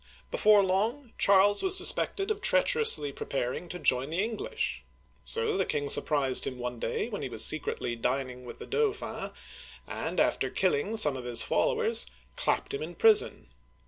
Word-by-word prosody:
Before 210 -1 +4
long, 220 +7 -2
Charles 200 +1 +4
was 380 0 +5
suspected 390 +2 +1
of 420 -1 -4
treacherously 455 - +1
preparing 135 +5 -5
to 180 - -6
join 130 -4 +1
the 170 +5 -1
English. 435 - -4 0.4
So 450 -3 -1
the - - +1
king 145 -1 -2
surprised 140 -2 +2
him 130 - -6
one 125 -1 -6
day - - -3
when 210 -4 -6
he - - -5
was 110 -2 +3
secretly 135 -5 0
dining 125 +1 -3
with 120 - -10
the - - -10
Dauphin, 440 -2 -3 0.6
and - - -5
after - - 0
killing 440 - -1
some 150 -10 +4
of 125 -2 -8
his 120 -1 +4
followers, - - +1 0.3
clapped - - -2
him 140 - -4
in 170 +3 -7
prison. 220 - +3
180 Hz, 165 wpm, -28 LUFS, -, 0.6 s, was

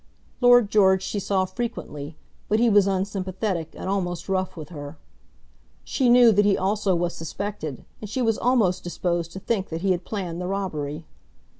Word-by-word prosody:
Lord 245 -4 +6
George 190 -2 +4
she 205 - -2
saw 190 -1 0
frequently; 165 -10 -5 0.3
but 215 - +3
he 235 -1 +4
was 200 -1 +5
unsympathetic 190 -2 -2
and - - -6
almost 180 -3 -2
rough 185 -2 -1
with 155 -2 -8
her. 145 -2 -8 0.9
She 260 -3 +1
knew 240 -1 +7
that 205 0 +4
he 205 -1 +3
also 195 0 +1
was 175 0 -1
suspected, 165 - -5 0.2
and 210 - -7
she 255 +4 -1
was 225 -2 +1
almost 230 -8 +2
disposed 175 -1 -2
to 190 - -6
think 195 -1 -2
that 165 0 -4
he 195 0 +2
had 175 -1 0
planned 180 -5 -4
the 180 - -3
robbery. 160 -6 -3
190 Hz, 175 wpm, -24 LUFS, 175-210 Hz, 0.9 s, knew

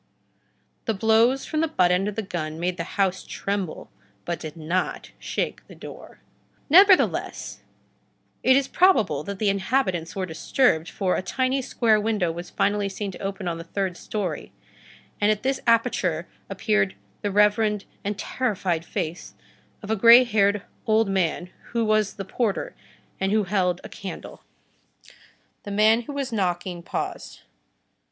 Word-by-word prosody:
The 225 - 0
blows 225 +5 +3
from 310 - -2
the 325 - +2
butt 180 - +2
end 185 +2 +2
of 210 - -3
the 220 - -2
gun 160 -4 -4
made 180 +1 -1
the - - -2
house 190 -2 +1
tremble, 195 -4 -4 0.3
but 170 -1 -3
did 155 0 -8
not 170 +4 -2
shake - - -3
the - - -13
door. - - -11 0.5
Nevertheless, 380 +3 +4 0.8
it 260 - +5
is 275 0 +2
probable 220 - +3
that 200 +4 -5
the 210 0 +1
inhabitants 190 -4 0
were 190 -1 -1
disturbed, 165 - +1
for 185 +2 0
a - - -1
tiny, 260 +8 0
square 225 -4 +2
window 205 -6 0
was 175 +2 -7
finally 205 0 0
seen 200 +1 -4
to - - -11
open 195 -1 -4
on 165 -1 -2
the - - -6
third 185 +1 -3
story, 205 +1 -4 0.7
and 205 - +4
at 215 +1 0
this 265 0 0
aperture 200 -8 +2 0.2
appeared 100 - 0 0.3
the 205 - -1
reverend 210 +1 +2 0.2
and 205 0 -3
terrified 190 -8 -1
face 165 +1 -5 0.5
of 205 - -4
a - - +3
gray 235 +4 +8
haired 205 -3 +2 0.2
old 220 -1 +3
man, 180 -1 -1 0.2
who 230 -1 +1
was 215 -2 +1
the 195 - -6
porter, 210 +1 -2 0.5
and 195 0 0
who 215 0 +3
held 180 -2 0
a - - -7
candle. 195 -3 -8 1.2
The - - -9
man 215 +3 +4
who 265 +5 -8
was 275 -3 -3
knocking 180 -3 -1
paused. - - -5
200 Hz, 155 wpm, -24 LUFS, 180-225 Hz, 1.2 s, gray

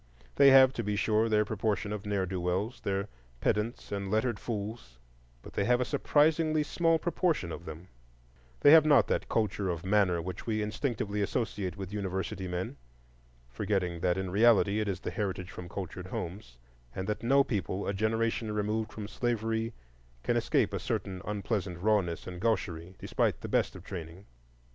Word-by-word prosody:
They 140 - +8
have, 130 -1 +8
to 115 - -3
be 105 0 -1
sure, 110 +2 +2
their 105 -1 +3
proportion 105 -1 -1
of 105 -1 -6
ne'er 100 -2 0
do 95 0 -3
wells, 95 +7 -1
their 100 +1 -1 0.3
pedants 105 - -1
and 100 -1 -3
lettered 110 +1 0
fools, 105 - -5 0.5
but - - -11
they - - 0
have 125 +2 +3
a 125 - +1
surprisingly 155 +2 +2
small 165 +2 +2
proportion 170 - 0
of 85 - -7
them; 80 +3 -8 0.7
they 145 - +8
have 160 -1 +9
not 145 -7 +5
that - - -1
culture 105 -3 0
of 85 0 -3
manner 95 -3 +3
which 90 +5 -6
we 110 -1 0
instinctively 105 -2 -2
associate 100 -3 -2
with 95 0 -6
university 95 -1 -3
men, 90 -5 -4 0.7
forgetting 90 +5 -1
that 90 +1 +1
in 95 -1 -3
reality 105 0 +4
it 105 - -1
is 95 -2 -2
the - - -4
heritage 95 -2 -3
from 90 -4 -8
cultured 95 -2 -6
homes, 90 - -6 0.4
and 95 - -3
that 105 - -2
no 135 +4 +4
people 100 -5 -2
a 100 - 0
generation 110 +1 0
removed 105 +1 -1
from 105 -1 -6
slavery 115 -1 -1 0.5
can - - +1
escape - - +1
a - - -1
certain 95 -1 -3
unpleasant 100 -3 -2
rawness 95 -3 +1
and 90 -1 -7
gaucherie, 90 -6 -1
despite - - 0
the - - -5
best - - +1
of - - -10
training. 85 +1 -8
105 Hz, 175 wpm, -30 LUFS, 95-115 Hz, 0.7 s, have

